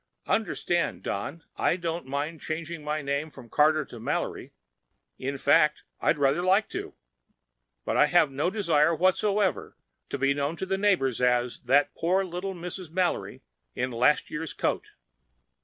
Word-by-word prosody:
Understand, 175 Hz, -5 st, 0 dB
Don, 140 Hz, +12 st, -4 dB
I -, -, +2 dB
don't 170 Hz, -4 st, -4 dB
mind 145 Hz, +4 st, -3 dB
changing 165 Hz, 0 st, -5 dB
my 150 Hz, 0 st, -2 dB
name 140 Hz, +3 st, -1 dB
from 130 Hz, -5 st, -13 dB
Carter 155 Hz, 0 st, +3 dB
to 120 Hz, -, -11 dB
Mallory. 110 Hz, -, -3 dB, 0.7 s
In 135 Hz, +2 st, -3 dB
fact, 150 Hz, +2 st, +3 dB, 0.2 s
I'd 155 Hz, -, +2 dB
rather 140 Hz, +3 st, +2 dB
like 190 Hz, +4 st, +3 dB
to. 395 Hz, +2 st, -6 dB, 0.9 s
But -, -, 0 dB
I -, -, +6 dB
have 175 Hz, -5 st, +4 dB
no 145 Hz, +6 st, 0 dB
desire 170 Hz, -6 st, +2 dB
whatever 190 Hz, +3 st, +1 dB, 0.3 s
to -, -, -3 dB
be 135 Hz, +1 st, +2 dB
known 145 Hz, +3 st, -1 dB
to 190 Hz, -, -4 dB
the 195 Hz, 0 st, -1 dB
neighbors 170 Hz, -, +2 dB
as 125 Hz, -1 st, +2 dB
'that 140 Hz, +3 st, +2 dB
poor 185 Hz, +3 st, +1 dB
little 185 Hz, +2 st, -4 dB
Mrs. 180 Hz, 0 st, -7 dB
Mallory 180 Hz, +1 st, -1 dB, 0.3 s
in 125 Hz, +1 st, -1 dB
last 125 Hz, +5 st, +2 dB
year's 160 Hz, +1 st, -4 dB
coat.' -, -, -1 dB
155 Hz, 155 wpm, -27 LUFS, 140-180 Hz, 0.9 s, I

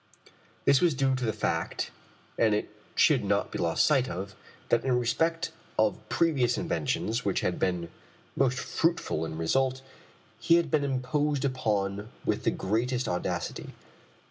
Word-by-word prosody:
This 135 Hz, -, +5 dB
was 170 Hz, -5 st, +3 dB
due 135 Hz, 0 st, +2 dB
to 130 Hz, -1 st, -1 dB
the 110 Hz, -, +1 dB
fact -, -, -2 dB, 0.4 s
and 110 Hz, -2 st, +3 dB
it 105 Hz, -, -3 dB, 0.2 s
should -, -, +4 dB
not -, -, 0 dB
be -, -, -4 dB
lost 85 Hz, -1 st, +2 dB
sight 135 Hz, -4 st, +3 dB
of 95 Hz, +3 st, -5 dB, 0.4 s
that 120 Hz, -, +3 dB
in 130 Hz, -2 st, +2 dB
respect 165 Hz, +8 st, 0 dB, 0.3 s
of -, -, +2 dB
previous 135 Hz, -8 st, +2 dB
inventions 130 Hz, -8 st, -1 dB
which 100 Hz, -, 0 dB
had 90 Hz, -, -1 dB
been 90 Hz, -2 st, 0 dB, 0.5 s
most 130 Hz, -2 st, +2 dB
fruitful 165 Hz, -, 0 dB
in 80 Hz, 0 st, -6 dB
result, 130 Hz, +10 st, +1 dB, 0.6 s
he 165 Hz, +8 st, +4 dB
had 170 Hz, -4 st, +1 dB
been 150 Hz, -2 st, +2 dB
imposed 140 Hz, +2 st, 0 dB
upon 105 Hz, -5 st, -1 dB, 0.2 s
with -, -, -1 dB
the -, -, +5 dB
greatest 120 Hz, +6 st, -1 dB
audacity. 90 Hz, 0 st, -3 dB
130 Hz, 150 wpm, -28 LUFS, 105-140 Hz, 0.6 s, This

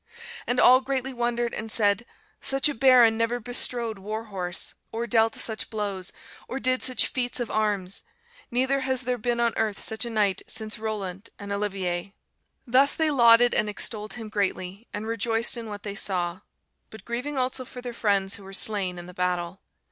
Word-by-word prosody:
And 245 Hz, +1 st, +1 dB
all 255 Hz, +1 st, +7 dB
greatly 265 Hz, 0 st, -2 dB
wondered, 240 Hz, -1 st, -1 dB
and 220 Hz, 0 st, -3 dB
said, 205 Hz, 0 st, +3 dB, 0.3 s
'Such 270 Hz, +2 st, +3 dB
a 295 Hz, -, -1 dB
baron 240 Hz, -3 st, +5 dB
never 230 Hz, +1 st, 0 dB
bestrode 240 Hz, -2 st, -2 dB
war 215 Hz, +3 st, -4 dB
horse, 185 Hz, -4 st, -2 dB, 0.2 s
or 230 Hz, +1 st, -3 dB
dealt 225 Hz, -1 st, +2 dB
such 220 Hz, -1 st, 0 dB
blows, 200 Hz, -4 st, -3 dB, 0.4 s
or 265 Hz, -, -4 dB
did 255 Hz, -1 st, +2 dB
such 255 Hz, -1 st, +2 dB
feats 245 Hz, -1 st, -2 dB
of 240 Hz, -, -3 dB
arms; 205 Hz, -3 st, -1 dB, 0.5 s
neither 260 Hz, +3 st, +1 dB
has 260 Hz, -1 st, 0 dB
there 250 Hz, 0 st, -1 dB
been 240 Hz, +2 st, -1 dB
on 235 Hz, -1 st, +2 dB
earth 215 Hz, -2 st, 0 dB
such 220 Hz, +1 st, -1 dB
a 240 Hz, -, -2 dB
knight 210 Hz, -4 st, +1 dB
since 215 Hz, -1 st, -3 dB
Rollant 205 Hz, -3 st, -4 dB
and 200 Hz, -1 st, -8 dB
Olivier.' 195 Hz, -2 st, -2 dB, 0.5 s
"Thus 265 Hz, +3 st, +4 dB
they 320 Hz, -2 st, +1 dB
lauded 240 Hz, -2 st, +6 dB
and 210 Hz, -, +1 dB
extolled 210 Hz, 0 st, -2 dB
him 225 Hz, -3 st, -7 dB
greatly, 200 Hz, 0 st, -2 dB
and 210 Hz, +1 st, -5 dB
rejoiced 230 Hz, +1 st, +1 dB
in 230 Hz, -2 st, -6 dB
what 205 Hz, -1 st, -7 dB
they 205 Hz, -, -4 dB
saw; 180 Hz, -3 st, -1 dB, 0.5 s
but 220 Hz, -3 st, -13 dB
grieving 250 Hz, +5 st, -4 dB
also 255 Hz, 0 st, 0 dB
for 250 Hz, -, -10 dB
their 245 Hz, -1 st, -6 dB
friends 200 Hz, -3 st, +1 dB
who 200 Hz, -, -13 dB
were 195 Hz, 0 st, -11 dB
slain 195 Hz, -3 st, +3 dB
in 175 Hz, -, -7 dB
the 180 Hz, -, -11 dB
battle. 180 Hz, 0 st, -2 dB
220 Hz, 185 wpm, -26 LUFS, 200-245 Hz, 0.5 s, all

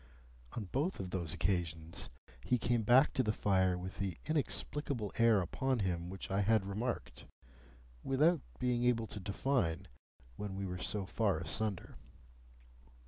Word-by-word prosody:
On 115 Hz, -, -3 dB
both 140 Hz, -, -1 dB
of 95 Hz, -2 st, -4 dB
those 85 Hz, -5 st, -2 dB
occasions, 85 Hz, -2 st, -2 dB, 0.3 s
he 125 Hz, -, +2 dB
came 120 Hz, 0 st, +1 dB
back 125 Hz, +6 st, +5 dB
to -, -, +2 dB
the 110 Hz, -4 st, +1 dB
fire 95 Hz, -3 st, +2 dB
with 90 Hz, +1 st, -7 dB
the 95 Hz, -5 st, -2 dB
inexplicable 145 Hz, -6 st, -1 dB
air 115 Hz, -3 st, +6 dB
upon 130 Hz, +9 st, 0 dB
him 90 Hz, -4 st, -1 dB
which 95 Hz, +1 st, -6 dB
I 100 Hz, +1 st, +2 dB
had 105 Hz, 0 st, +3 dB
remarked, 110 Hz, +5 st, -3 dB, 0.8 s
without 150 Hz, +4 st, +3 dB, 0.2 s
being 125 Hz, -1 st, +1 dB
able 120 Hz, -2 st, +3 dB
to 105 Hz, -, -7 dB
define, 95 Hz, -3 st, 0 dB, 0.5 s
when 100 Hz, -2 st, -4 dB
we 100 Hz, 0 st, -3 dB
were 90 Hz, -1 st, -4 dB
so 100 Hz, +1 st, -2 dB
far 100 Hz, 0 st, +1 dB
asunder. 95 Hz, +2 st, -2 dB
100 Hz, 145 wpm, -35 LUFS, 95-120 Hz, 0.8 s, air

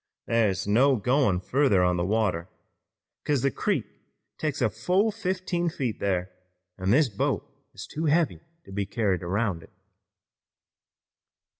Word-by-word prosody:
Thar's 110 Hz, -5 st, +1 dB
no 130 Hz, +7 st, +4 dB
goin' 125 Hz, -4 st, +2 dB
further 125 Hz, -2 st, +2 dB
on 90 Hz, 0 st, +2 dB
the 85 Hz, -, 0 dB
water, 95 Hz, -3 st, 0 dB, 0.7 s
'cause 145 Hz, -4 st, 0 dB
the 140 Hz, -, +2 dB
creek -, -, -1 dB, 0.5 s
takes 155 Hz, -2 st, -2 dB
a 120 Hz, -, +3 dB
fall 180 Hz, -, +1 dB
of -, -, -5 dB
fifteen 185 Hz, -4 st, -1 dB
feet 130 Hz, -8 st, -3 dB
thar, 95 Hz, -2 st, -1 dB, 0.5 s
an' 95 Hz, +1 st, -1 dB
this 140 Hz, +7 st, +5 dB
boat 105 Hz, -4 st, -1 dB, 0.3 s
is -, -, -7 dB
too 160 Hz, +2 st, -4 dB
heavy 160 Hz, +1 st, +2 dB, 0.2 s
to -, -, -13 dB
be 100 Hz, 0 st, -2 dB
carried 100 Hz, -4 st, 0 dB
around 95 Hz, 0 st, -1 dB
it." -, -, -15 dB
115 Hz, 145 wpm, -26 LUFS, 95-145 Hz, 0.7 s, this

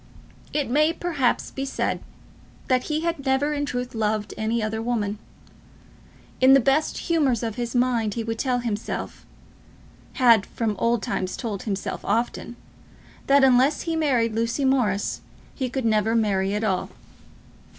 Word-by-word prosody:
It 295 Hz, -1 st, -1 dB
may, 305 Hz, +6 st, +3 dB
perhaps, 315 Hz, -8 st, -1 dB
be 270 Hz, -, -4 dB
said 275 Hz, -, -2 dB, 0.7 s
that 255 Hz, -1 st, +2 dB
he 305 Hz, 0 st, -1 dB
had 335 Hz, -3 st, -2 dB
never 270 Hz, +2 st, +1 dB
in 290 Hz, -1 st, -2 dB
truth 250 Hz, -1 st, -4 dB
loved 215 Hz, -1 st, -1 dB
any 220 Hz, +1 st, -1 dB
other 220 Hz, +1 st, -2 dB
woman. 215 Hz, -3 st, -2 dB, 1.2 s
In 260 Hz, +1 st, +7 dB
the 275 Hz, -, +7 dB
best 275 Hz, +5 st, +1 dB
humours 285 Hz, -, +1 dB
of 225 Hz, -2 st, -2 dB
his 240 Hz, +1 st, -4 dB
mind 240 Hz, -4 st, +1 dB
he 230 Hz, -, -2 dB
would 225 Hz, 0 st, -4 dB
tell 255 Hz, -2 st, +1 dB
himself, 220 Hz, -3 st, -4 dB, 0.9 s
had 230 Hz, -6 st, +4 dB
from 220 Hz, -3 st, -2 dB
old 235 Hz, -1 st, +1 dB
times 185 Hz, 0 st, -2 dB
told 215 Hz, -6 st, -4 dB
himself 200 Hz, -3 st, -4 dB
often, 235 Hz, +2 st, -1 dB, 0.7 s
that 275 Hz, 0 st, +5 dB
unless 265 Hz, +3 st, +4 dB
he 330 Hz, -1 st, -2 dB
married 250 Hz, -8 st, +1 dB
Lucy 230 Hz, +5 st, 0 dB
Morris 230 Hz, -7 st, +1 dB, 0.3 s
he 260 Hz, -3 st, -3 dB
could 260 Hz, -1 st, -3 dB
never 220 Hz, 0 st, +2 dB
marry 200 Hz, -3 st, +1 dB
at 210 Hz, -, -2 dB
all. 190 Hz, -4 st, 0 dB
240 Hz, 150 wpm, -24 LUFS, 220-270 Hz, 1.2 s, In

